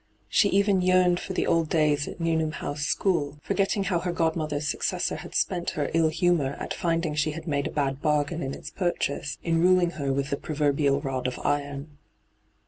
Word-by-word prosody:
She 205 - +4
even 200 -1 +3
yearned 180 -1 +4
for 190 - -5
the - - 0
old 165 -2 +2
days 150 -2 +2
at - - -8
Newnham 160 -2 0
House 145 -2 -4
School, 150 -7 0
foi^tting 195 0 +1
how 180 -3 +1
her 175 +1 -2
godmother's 160 -3 -1
successor - - -1
had - - -9
spent 175 -1 0
her 145 - -1
ill 165 -1 +4
humour 160 -4 +1
at - - -4
finding 165 -2 -1
she 150 0 0
had 165 +1 -7
made 140 -2 0
a - - -6
bad 140 -2 -1
bargain 150 +2 0
in 135 0 -3
its 155 - -9
purchase, 150 -5 -2
in 165 -1 +1
ruling 180 -1 +4
her 140 -1 0
with 140 +1 -1
the 140 - 0
proverbial 145 -2 +1
rod 130 -3 -2
of 125 - -4
iron. 145 0 -2
155 Hz, 195 wpm, -26 LUFS, 145-175 Hz, -, She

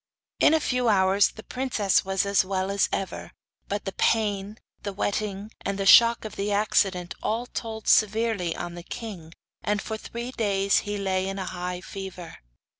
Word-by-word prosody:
In 315 - +6
a - - +3
few 250 -5 0
hours 195 -1 +4
the 220 - -12
princess 250 -7 +1
was 190 0 0
as 200 -1 +3
well 190 0 -2
as 200 0 +2
ever; 195 - -4 0.3
but 205 +1 -3
the 195 - -2
pain, 205 -1 0 0.2
the 200 - -4
wetting, 205 +1 -2
and 200 0 -2
the 195 - -2
shock 230 +3 +7
of 215 - -7
the 200 +1 -1
accident, 195 -3 +1
all 230 +3 -1
told 225 -3 -6
severely 215 -5 +2
on 175 0 -5
the 175 - -8
king, 180 -4 -8 0.3
and 210 0 0
for 220 +2 -4
three 235 +3 -6
days 200 -4 +2
he 205 - -2
lay 190 -1 -1
in 195 - -4
a 190 - -3
high 180 0 -4
fever. 185 -3 -8
200 Hz, 180 wpm, -26 LUFS, 190-220 Hz, 0.3 s, shock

